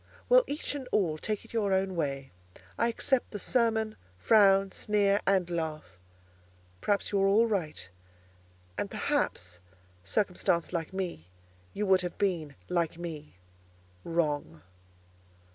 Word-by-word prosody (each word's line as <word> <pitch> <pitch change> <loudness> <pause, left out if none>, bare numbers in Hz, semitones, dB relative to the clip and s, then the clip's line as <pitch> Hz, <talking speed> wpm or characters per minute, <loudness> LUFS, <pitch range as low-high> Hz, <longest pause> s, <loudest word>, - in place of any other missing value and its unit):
Well, - - +7
each 285 0 -2
and 270 -3 -6
all, 165 -7 +1
take 215 +3 -3
it - - -16
your 210 -4 +1
own 190 0 +1
way. 140 -4 -2 0.4
I 230 - +2
accept 245 +2 0
the 210 - -5
sermon, 220 0 +1 0.2
frown, 195 - +5
sneer, 205 -1 +2
and 190 -3 +3
laugh; 160 - -4 0.8
perhaps 200 -1 0
you 200 -1 +2
are 195 - +4
all 210 +4 +5
right: 175 - -2 0.9
and - - -2
perhaps, 90 0 -1 0.4
circumstanced 180 - 0
like 165 -1 -2
me, 180 - -4 0.5
you 210 - -1
would 190 -1 +4
have 180 -1 -5
been, 170 -8 -1
like 170 -2 0
me, 155 - -7 0.7
wrong. 145 - -1
190 Hz, 130 wpm, -30 LUFS, 160-210 Hz, 0.9 s, Well